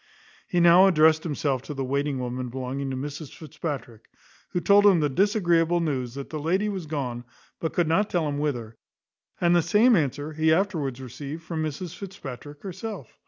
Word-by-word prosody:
He 180 Hz, -, 0 dB
now 175 Hz, +3 st, +7 dB
addressed 160 Hz, -3 st, +5 dB
himself 140 Hz, -5 st, -1 dB
to 145 Hz, +2 st, -7 dB
the 135 Hz, -, -2 dB
waiting 140 Hz, +1 st, -1 dB
woman 125 Hz, 0 st, -4 dB
belonging 130 Hz, +2 st, -4 dB
to 130 Hz, -, -3 dB
Mrs 145 Hz, +2 st, -6 dB
Fitzpatrick; 140 Hz, -7 st, -6 dB, 0.4 s
who 175 Hz, -, -1 dB
told 205 Hz, +3 st, +5 dB
him 190 Hz, -4 st, +6 dB
the 150 Hz, -2 st, +1 dB
disagreeable 175 Hz, -, +2 dB
news 130 Hz, -7 st, -2 dB
that 140 Hz, -1 st, -7 dB
the 155 Hz, -, -3 dB
lady 185 Hz, +7 st, 0 dB
was 190 Hz, -5 st, -5 dB
gone, 125 Hz, -6 st, -3 dB, 0.4 s
but 160 Hz, -, -3 dB
could 175 Hz, -2 st, +1 dB
not 195 Hz, +6 st, +2 dB
tell 170 Hz, -4 st, 0 dB
him 145 Hz, -1 st, -2 dB
whither; 120 Hz, -7 st, -3 dB, 0.6 s
and 175 Hz, 0 st, +3 dB
the 175 Hz, -, +5 dB
same 210 Hz, +9 st, +4 dB
answer 145 Hz, -1 st, -1 dB
he 160 Hz, +1 st, +2 dB
afterwards 160 Hz, -8 st, 0 dB
received 140 Hz, +5 st, -7 dB
from 160 Hz, 0 st, -4 dB
Mrs 155 Hz, +3 st, -4 dB
Fitzpatrick 145 Hz, -6 st, -9 dB
herself. 195 Hz, -, -7 dB
155 Hz, 180 wpm, -26 LUFS, 135-175 Hz, 0.6 s, now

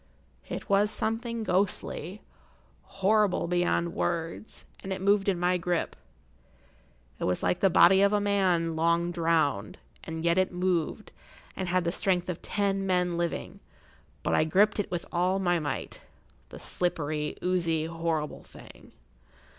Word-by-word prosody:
It -, -, -5 dB
was 200 Hz, 0 st, +3 dB
something 225 Hz, +1 st, -2 dB
ghostly, 185 Hz, -1 st, -2 dB, 0.6 s
horrible 195 Hz, -1 st, +1 dB
beyond 175 Hz, -1 st, 0 dB
words, 170 Hz, +5 st, -3 dB, 0.2 s
and 195 Hz, -, -6 dB
it 190 Hz, -, -2 dB
moved 200 Hz, +1 st, +2 dB
in 185 Hz, -3 st, 0 dB
my 180 Hz, +1 st, +2 dB
grip. 175 Hz, -1 st, -1 dB, 1.2 s
It -, -, -2 dB
was 90 Hz, -, -1 dB
like 180 Hz, -, +1 dB
the 195 Hz, -, +4 dB
body 190 Hz, +2 st, +6 dB
of 200 Hz, 0 st, +4 dB
a 210 Hz, -, +2 dB
man 185 Hz, -5 st, +1 dB
long 170 Hz, +2 st, +1 dB
drowned, 160 Hz, -, 0 dB, 0.3 s
and 160 Hz, 0 st, -5 dB
yet 170 Hz, +2 st, +3 dB
it 185 Hz, -, +1 dB
moved, 180 Hz, -3 st, -1 dB, 0.4 s
and 190 Hz, -, -3 dB
had 180 Hz, 0 st, +2 dB
the 170 Hz, -, 0 dB
strength 180 Hz, -1 st, 0 dB
of[Pg 175 Hz, -, -4 dB
67] -, -, -7 dB, 0.2 s
ten 195 Hz, -, -3 dB
men 180 Hz, -2 st, +1 dB
living; 170 Hz, 0 st, -3 dB, 0.6 s
but -, -, 0 dB
I -, -, +4 dB
gripped 200 Hz, +7 st, +3 dB
it 205 Hz, -, -1 dB
with 175 Hz, -2 st, -3 dB
all 180 Hz, +2 st, +1 dB
my 175 Hz, -3 st, +1 dB
might—the 150 Hz, -2 st, -8 dB
slippery, 155 Hz, -4 st, -2 dB
oozy, 170 Hz, -3 st, 0 dB
horrible 165 Hz, -2 st, -3 dB
thing. -, -, -15 dB
180 Hz, 145 wpm, -28 LUFS, 165-195 Hz, 1.2 s, body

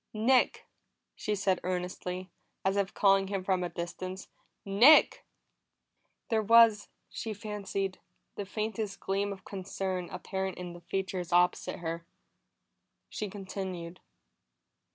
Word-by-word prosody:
"Nick!" 245 Hz, +4 st, +3 dB, 0.5 s
she 210 Hz, -, -2 dB
said 190 Hz, -2 st, +1 dB
earnestly, 180 Hz, 0 st, -3 dB, 0.3 s
as 190 Hz, +1 st, +2 dB
if 200 Hz, -1 st, 0 dB
calling 195 Hz, -1 st, +4 dB
him 195 Hz, -1 st, -2 dB
from 185 Hz, -1 st, +1 dB
a 175 Hz, -, -2 dB
distance. 185 Hz, +2 st, -6 dB, 0.4 s
"Nick!" 230 Hz, +10 st, +6 dB, 1.0 s
There 225 Hz, -2 st, +2 dB
was, 225 Hz, -1 st, +6 dB, 0.2 s
she 220 Hz, -2 st, -5 dB
fancied, 200 Hz, -2 st, -3 dB, 0.3 s
the 205 Hz, -, -4 dB
faintest 215 Hz, 0 st, -3 dB
gleam 200 Hz, +1 st, -1 dB
of 195 Hz, -1 st, -9 dB
concern 185 Hz, -2 st, -4 dB
apparent 190 Hz, -1 st, -4 dB
in 180 Hz, -1 st, -6 dB
the 175 Hz, -, -11 dB
features 185 Hz, -1 st, -3 dB
opposite 175 Hz, +1 st, +2 dB
her. 165 Hz, 0 st, -3 dB, 1.1 s
She 210 Hz, -, -4 dB
continued. 185 Hz, -3 st, -6 dB
195 Hz, 115 wpm, -30 LUFS, 180-205 Hz, 1.1 s, Nick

